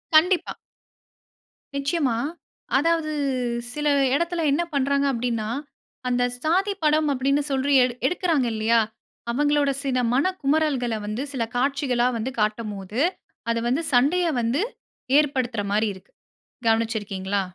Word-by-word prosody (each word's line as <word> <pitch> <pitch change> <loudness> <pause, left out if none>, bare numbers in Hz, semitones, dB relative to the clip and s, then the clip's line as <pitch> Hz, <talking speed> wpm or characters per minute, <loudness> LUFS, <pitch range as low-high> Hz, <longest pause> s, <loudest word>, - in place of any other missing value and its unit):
கண்டிப்பா. 355 +3 +4 1.2
நிச்சயமா, 280 -3 0 0.6
அதாவது 325 +1 +1 0.6
சில 295 0 -2 0.3
இடத்தில 340 +1 0
என்ன 330 +5 +2
பண்றாங்க 280 0 +1
அப்டின்னா, 230 -3 -2 0.6
அந்த 245 0 +1 0.2
சாதி 380 +6 +2
படம் 305 0 +3
அப்டின்னு 275 +2 +1
சொல்லி 270 +1 +1
எடுக் 250 0 -3
எடுக்குறாங்க 330 -7 +1
இல்லியா, 225 +1 +3 0.5
அவங்களோட 290 +2 +2
சில 265 -2 0 0.2
மனக்குமறல்கள 285 -5 +1
வந்து 215 +6 -3
சில 245 -4 -1
காட்சிகளா 255 -1 +1
வந்து 245 +4 -3
காட்டும்போது, 210 -1 -2 0.5
அது 230 - 0
வந்து 270 +7 +1
சண்டைய 295 +9 +4 0.2
வந்து 240 - +1 0.6
ஏற்படுத்துற 255 -7 0
மாரி 215 +1 +2
இருக்கு. 190 - -18 0.6
கவனிச்சுருக்கீங்களா? 205 -3 0
270 Hz, 110 wpm, -24 LUFS, 230-300 Hz, 1.2 s, கண்டிப்பா